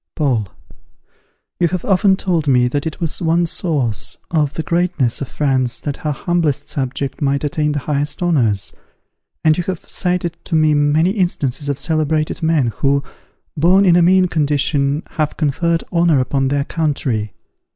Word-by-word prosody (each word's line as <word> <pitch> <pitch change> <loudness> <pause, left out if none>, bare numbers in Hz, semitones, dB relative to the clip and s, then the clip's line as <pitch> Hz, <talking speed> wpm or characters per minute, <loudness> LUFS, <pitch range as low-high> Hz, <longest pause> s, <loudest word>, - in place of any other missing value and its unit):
Paul. 125 -9 0 1.1
You 175 - +3
have 175 +1 -3
often 195 0 +3
told 175 -6 -1
me 125 -2 +4
that 145 +4 -2
it 155 - -6
was 165 -1 -1
one 170 +1 +2
source 145 - -1
of 150 -4 0
the 160 - -2
greatness 170 -8 0
of 140 - -3
France 130 -4 0
that 145 -2 -4
her 155 - -3
humblest 150 -2 -1
subject 135 +1 -3
might 140 0 0
attain 150 0 0
the - - -2
highest 150 +4 -1
honours; 115 - +1 0.7
and 155 -1 +4
you - - 0
have 185 -3 -5
cited 180 -2 -2
to 165 - -2
me 155 -1 +4
many 150 +4 +2
instances 145 - -1
of 140 - -1
celebrated 155 +1 -1
men 155 -8 +1
who, 140 0 +1 0.5
born 180 +6 +4
in 175 -2 +5
a 175 - +5
mean 185 +2 +5
condition, 145 -1 0
had 155 -2 -3
conferred 165 +3 0
honour 170 -4 +3
upon 135 +1 0
their 140 +1 0
country. 140 -9 -2
150 Hz, 160 wpm, -18 LUFS, 140-170 Hz, 1.1 s, in